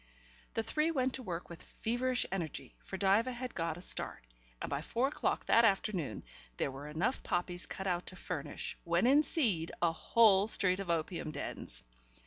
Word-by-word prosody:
The 225 - +1
three 305 +7 +1
went 260 -5 +1
to 265 - -3
work 175 -7 -4
with 170 0 -10
feverish 245 +2 -1
energy, 170 -6 -4
for 190 - -7
Diva 200 +6 +3
had 250 0 -5
got 165 -1 -2
a - - -9
start, - - 0 0.3
and - - -3
by 140 - -2
four 240 - 0
o'clock - - -1
that 230 - +6
afternoon 195 - +1 0.3
there 140 - 0
were 140 +2 -8
enough 175 - -1
poppies 175 -1 -2
cut 190 - -5
out 180 -2 -1
to 185 - -7
furnish, 170 - -4
when - - +2
in 275 +4 +6
seed, 220 - +1
a 170 -1 +3
whole 205 +3 +5
street 185 -3 +3
of 195 -3 -5
opium 165 0 -1
dens. - - -5
190 Hz, 180 wpm, -34 LUFS, 170-240 Hz, 0.3 s, that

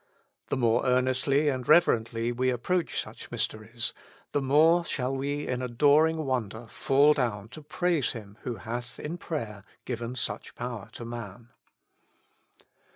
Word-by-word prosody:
The - - 0
more 120 -1 +3
earnestly 130 +3 +2
and 130 -3 -1
reverently 115 -7 +3
w^e 130 +1 +1
ap 120 -1 -4
proach 180 -2 0
such - - -7
mysteries, 110 +2 -2 0.4
the 145 - +1
more 155 +6 +5
shall 130 -4 -2
we 145 +2 -2
in 125 0 -2
adoring 150 +6 +3
wonder 120 -3 -2
fall 140 +5 +4
down 115 -7 -2
to 140 +6 -10
praise 155 -1 0
Him 105 -2 -10
who 125 - -3
hath 120 +4 -6
in 165 +4 -5
prayer 110 - -5 0.2
given 120 0 -4
such 130 - -4
power 120 -4 -5
to 120 - -7
man. 115 -1 -8
125 Hz, 145 wpm, -28 LUFS, 115-145 Hz, 0.4 s, more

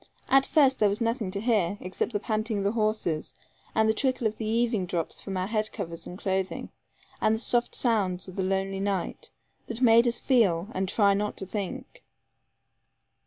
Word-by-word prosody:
At 270 0 +5
first 275 -4 +4
there 210 - +4
was 200 - -2
nothing 230 -3 -1
to 195 +1 -3
hear, 205 -4 +1
except 185 +6 -3
the 205 - -1
panting 215 +1 -1
of 200 - -1
the 200 - +2
horses 215 -8 -1 0.4
and 220 0 +4
the 220 - +4
trickle 255 0 0
of 220 0 0
the 220 - -4
eaving 225 -4 +1
drops 170 -2 -3
from 195 -2 -5
our 185 - 0
head 215 +1 -1
covers 165 0 -6
and 180 - -8
clothing, 190 -1 -2 0.5
and 215 - +3
the - - -4
soft 240 +1 0
sounds 195 -7 +1
of 185 - -9
the 195 - -1
lonely 195 +1 -1
night, 195 -2 -2 0.4
that 230 0 -4
make 235 -1 +6
us 235 - +1
feel, 200 -8 +2
and 190 -2 -2
try 200 -1 +4
not 210 +1 -2
to 195 - -4
think. 210 +7 -6
210 Hz, 195 wpm, -27 LUFS, 190-230 Hz, 0.5 s, make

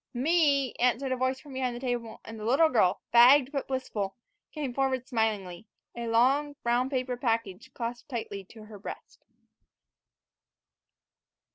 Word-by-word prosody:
"Me," 280 -1 +2
answered 250 +2 +1
a - - +2
voice 260 +1 -1
from 285 -1 -13
behind 255 -2 -2
the - - -6
table, 240 -3 -3
and 225 0 -8
the - - -7
little 275 +8 +4
girl, 210 -8 +2
fagged 255 +3 +7
but 275 -3 -3
blissful, 230 -7 -3 0.4
came 290 -5 -4
forward 260 -1 -1
smilingly, 215 -5 -2 0.3
a 235 -1 -4
long, 270 +6 +2
brown 240 +2 +1
paper 255 -2 -2
package 230 -6 -2
clasped 240 +4 -5
tightly 215 -6 -5
to 215 +3 -14
her 215 -1 -12
breast. 200 - -9
245 Hz, 145 wpm, -28 LUFS, 225-265 Hz, 0.4 s, fagged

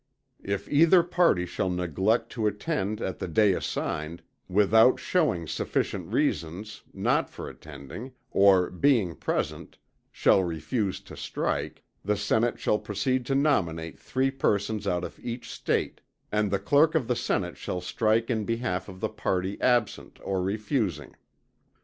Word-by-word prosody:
If 100 0 -3
either 165 +4 +5
party 170 - +2
shall 95 +1 -2
neglect 95 +6 0
to 110 -3 0
attend 105 - -2
at 95 - -3
the - - -3
day 100 +4 +4
assigned, 80 -1 -3 0.3
without 110 +5 +5
shewing 150 - +1
sufficient - - -2
reasons 90 +7 -1
for - - -22
not - - 0
attending, 75 - -8 0.2
or, 95 -2 +5
being 105 - +2
present, - - -3 0.3
shall 95 - +3
refuse 90 - -2
to - - -12
strike, - - -3 0.2
the 105 +1 0
Senate 110 +3 +1
shall 105 - +1
proceed 120 +5 -1
to 135 - +1
nominate 85 - 0
three 130 +1 0
persons 110 -5 0
out 90 0 0
of - - -7
each 120 +1 -5
State, - - -2 0.3
and 105 -1 +1
the 100 - +1
clerk 145 - +3
of 140 -8 +1
the 125 - +1
Senate 95 -6 -1
shall 90 - -4
strike 110 +5 +1
in 110 -2 0
behalf 115 -4 -2
of 95 -1 -11
the - - 0
party 95 +1 -2
absent 120 -4 +1
or 95 -1 -1
refusing. 105 - -2
105 Hz, 145 wpm, -27 LUFS, 90-120 Hz, 0.3 s, either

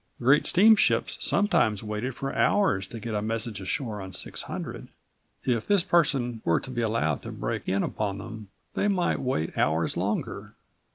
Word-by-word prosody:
Great 135 +5 +4
steamships 215 +4 +5
sometimes 120 - +2
waited 110 +4 -3
for 135 - -4
hours 105 - +2
to 115 - -8
get 115 +1 -5
a 105 - 0
message 110 -1 -3
ashore 110 0 -3
on 95 0 -7
600. 90 - -5 0.6
If 120 -4 0
this 200 -4 +3
person 135 -10 +1
were 85 - +2
to 130 - -8
be 120 -2 -2
allowed 110 - 0
to - - -7
break - - -4
in 100 +1 +1
upon 100 -2 -2
them 110 -1 -8 0.2
they - - +1
might 190 -4 +1
wait 125 -12 -2
hours 80 +1 +1
longer. 100 +4 -3
115 Hz, 165 wpm, -27 LUFS, 100-135 Hz, 0.6 s, steamships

